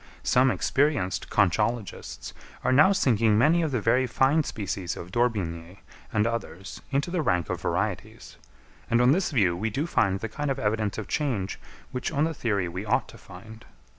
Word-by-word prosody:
Some 130 Hz, +1 st, +4 dB
experienced 135 Hz, -8 st, 0 dB
conchologists 105 Hz, +3 st, -1 dB, 0.3 s
are -, -, +2 dB
now 150 Hz, +9 st, +6 dB
sinking 115 Hz, -, +3 dB
many 155 Hz, +9 st, +4 dB
of 160 Hz, -, 0 dB
the 130 Hz, -4 st, -1 dB
very 125 Hz, +4 st, +2 dB
fine 135 Hz, +6 st, +2 dB
species 100 Hz, -7 st, -4 dB
of 90 Hz, -, -8 dB
D'Orbigny 95 Hz, -7 st, -2 dB, 0.3 s
and 105 Hz, 0 st, +1 dB
others 115 Hz, -5 st, -5 dB
into 140 Hz, +4 st, -1 dB
the 180 Hz, -2 st, 0 dB
rank 90 Hz, -, 0 dB
of -, -, -4 dB
varieties; -, -, -3 dB, 0.5 s
and 115 Hz, -, +3 dB
on 125 Hz, +1 st, +5 dB
this 180 Hz, +5 st, +1 dB
view 100 Hz, -, +2 dB
we 110 Hz, +6 st, -2 dB
do 135 Hz, +8 st, -2 dB
find 100 Hz, -, +1 dB
the 115 Hz, -, -4 dB
kind 145 Hz, +6 st, -4 dB
of 135 Hz, -, -1 dB
evidence 105 Hz, -3 st, -1 dB
of 110 Hz, -, -5 dB
change 120 Hz, -11 st, -2 dB, 0.3 s
which 125 Hz, -1 st, -3 dB
on 145 Hz, -1 st, +1 dB
the 165 Hz, +1 st, 0 dB
theory 100 Hz, -, -1 dB
we 90 Hz, +3 st, -5 dB
ought 105 Hz, -, 0 dB
to -, -, -12 dB
find. 110 Hz, +5 st, -12 dB
115 Hz, 180 wpm, -26 LUFS, 100-135 Hz, 0.5 s, now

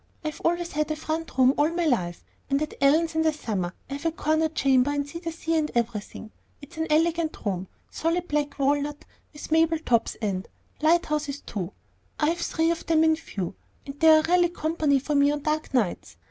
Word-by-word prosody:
I've 305 Hz, -1 st, -4 dB
always 345 Hz, 0 st, 0 dB
had 305 Hz, +1 st, -1 dB
a 310 Hz, -, -1 dB
front 315 Hz, -1 st, -4 dB
room 260 Hz, 0 st, +6 dB
all 295 Hz, +2 st, +4 dB
my 340 Hz, 0 st, -1 dB
life. 180 Hz, -, 0 dB, 0.3 s
And 275 Hz, 0 st, +2 dB
at 305 Hz, 0 st, -3 dB
Ellen's 315 Hz, +4 st, +4 dB
in 320 Hz, -, +1 dB
the 320 Hz, 0 st, +3 dB
summer, 200 Hz, -12 st, -3 dB
I 275 Hz, -, -6 dB
have 280 Hz, +3 st, -6 dB
a -, -, +1 dB
corner 315 Hz, 0 st, +1 dB
chamber, 270 Hz, -3 st, +3 dB
and 285 Hz, 0 st, -1 dB
see 335 Hz, +3 st, -7 dB
the 335 Hz, -1 st, -4 dB
sea 330 Hz, 0 st, -2 dB
and 310 Hz, -1 st, +1 dB
everything 225 Hz, -2 st, -3 dB, 0.3 s
It's 290 Hz, +4 st, -13 dB
an 320 Hz, 0 st, -1 dB
elegant 325 Hz, +1 st, +1 dB
room, 190 Hz, -2 st, -2 dB, 0.2 s
solid 335 Hz, +2 st, -1 dB
black 295 Hz, -1 st, -1 dB
walnut 290 Hz, +1 st, 0 dB, 0.3 s
with 295 Hz, +1 st, -10 dB
marble 325 Hz, 0 st, +4 dB
tops, 235 Hz, -7 st, 0 dB
and 195 Hz, -4 st, -2 dB, 0.3 s
Lighthouses 305 Hz, -3 st, +1 dB
too; 190 Hz, -2 st, -5 dB, 0.5 s
I 300 Hz, -, +3 dB
have 340 Hz, +1 st, -1 dB
three 325 Hz, 0 st, +1 dB
of 335 Hz, -, -4 dB
them 320 Hz, -1 st, +4 dB
in 320 Hz, 0 st, +5 dB
view, 195 Hz, -, -5 dB, 0.3 s
and 275 Hz, +1 st, -9 dB
they 320 Hz, -, +6 dB
are 310 Hz, 0 st, +7 dB
really 350 Hz, +1 st, +3 dB
company 315 Hz, -4 st, +1 dB
for 280 Hz, +3 st, -2 dB
me 285 Hz, 0 st, +4 dB
on 295 Hz, 0 st, -1 dB
dark 310 Hz, 0 st, -1 dB
nights. 205 Hz, -, -1 dB
305 Hz, 205 wpm, -26 LUFS, 275-325 Hz, 0.5 s, are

